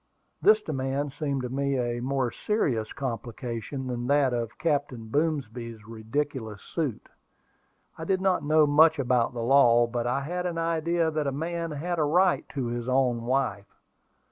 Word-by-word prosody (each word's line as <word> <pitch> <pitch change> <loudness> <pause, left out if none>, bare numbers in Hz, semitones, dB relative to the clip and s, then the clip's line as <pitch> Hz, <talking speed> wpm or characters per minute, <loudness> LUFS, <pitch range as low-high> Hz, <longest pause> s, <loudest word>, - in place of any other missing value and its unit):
This 215 0 +5
demand 135 -2 -2
seemed 140 -4 -2
to 125 - -3
me 140 +1 -1
a 120 -1 -1
more 130 -1 0
serious 125 - -1
complication 125 0 -5
than 120 -1 -3
that 140 -2 +3
of 120 -1 -3
Captain 140 -8 -1
Boomsby's 120 -7 -2
ridiculous 115 -1 -4
suit. 150 -9 -3 0.9
I 160 - -5
did 190 +1 +1
not 190 -1 +1
know 155 +1 +4
much 155 +3 +5
about 125 -3 +1
law, 120 -1 +5
but 120 0 -3
I 125 +3 0
had 180 +5 -3
an 170 -2 -4
idea 165 0 0
that 155 -2 -1
a - - +1
man 165 +4 -3
had 165 +3 -3
a - - +3
right 175 +5 +2
to 135 -4 -3
his 120 +1 -3
own 125 -3 +1
wife. 125 -6 -1
135 Hz, 160 wpm, -27 LUFS, 120-155 Hz, 0.9 s, This